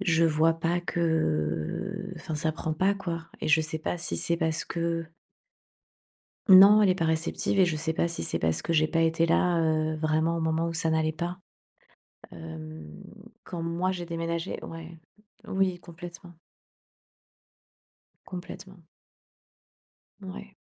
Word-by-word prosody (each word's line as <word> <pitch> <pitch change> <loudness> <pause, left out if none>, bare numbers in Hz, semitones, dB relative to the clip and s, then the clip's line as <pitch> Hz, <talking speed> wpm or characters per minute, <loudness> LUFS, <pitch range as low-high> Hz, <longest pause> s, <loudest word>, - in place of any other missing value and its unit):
je 165 -3 +3
vois 160 +1 +3
pas 170 +2 0
que, 175 0 -3
heu, 160 - -1
enfin 165 -1 -5
ça 155 +1 0
prend 160 0 -3
pas, 190 +5 +2
quoi. 170 -4 -5 0.2
Et - - -1
je 155 +1 +5
sais 155 0 -4
pas 175 - -3
si 165 - -2
c'est 170 - +1
parce 160 0 0
que 170 -1 -2 1.4
Non, 200 +3 +9
elle 205 - +5
est - - +3
pas 165 - 0
réceptive 160 +4 0
et - - +7
je 170 -3 0
sais 160 +1 -1
pas 170 - 0
si 170 - -4
c'est - - -2
parce 80 0 0
que - - -1
j'ai 155 -1 +3
pas 165 - +1
été 165 0 +2
là, 170 +1 +3
heu, 155 -1 +1
vraiment 160 +1 +1
au - - -2
moment 160 +1 0
où 165 - -3
ça 165 0 +1
n'allait 160 0 +1
pas. 175 +3 -4 0.9
Hem, 80 -2 -9 0.4
quand 175 - -6
moi 170 +3 -1
j'ai 175 -2 -4
déménagé 165 0 -3
ouais. 165 0 -9 0.5
Oui, 190 -2 0
complètement. 175 0 -11 1.9
Complètement. 185 0 -9 1.4
Ouais. 195 +1 -9
165 Hz, 155 wpm, -27 LUFS, 160-175 Hz, 1.9 s, Non